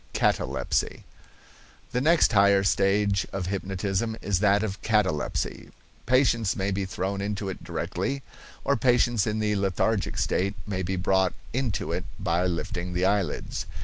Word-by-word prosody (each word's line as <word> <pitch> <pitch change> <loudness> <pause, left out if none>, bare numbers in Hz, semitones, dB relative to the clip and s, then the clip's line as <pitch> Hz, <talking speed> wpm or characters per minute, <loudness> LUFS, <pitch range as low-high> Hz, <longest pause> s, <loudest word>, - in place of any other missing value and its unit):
CATALEPSY. - - 0 0.9
The 125 - 0
next 160 -3 +4
higher 100 -1 +5
stage 100 0 +2
of 95 -2 -3
hypnotism 95 +3 -2
is 100 -3 0
that 100 +1 +3
of 100 -2 -4
catalepsy. 105 -8 0 0.4
Patients 120 -4 +3
may 95 +1 -1
be 95 0 -1
thrown 95 +1 -3
into 100 0 -3
it 95 - -7
directly, 140 -1 -3 0.4
or 140 - +2
patients 120 -3 +2
in 105 0 0
the 105 -1 +1
lethargic 100 +2 0
state 100 +2 0
may 95 -2 -3
be 95 +1 -2
brought 95 0 +2 0.2
into 125 -4 -1
it - - -2
by 85 +2 +1
lifting 90 +1 -3
the 90 +1 +2
eyelids. 100 -2 -1
100 Hz, 145 wpm, -26 LUFS, 95-110 Hz, 0.9 s, higher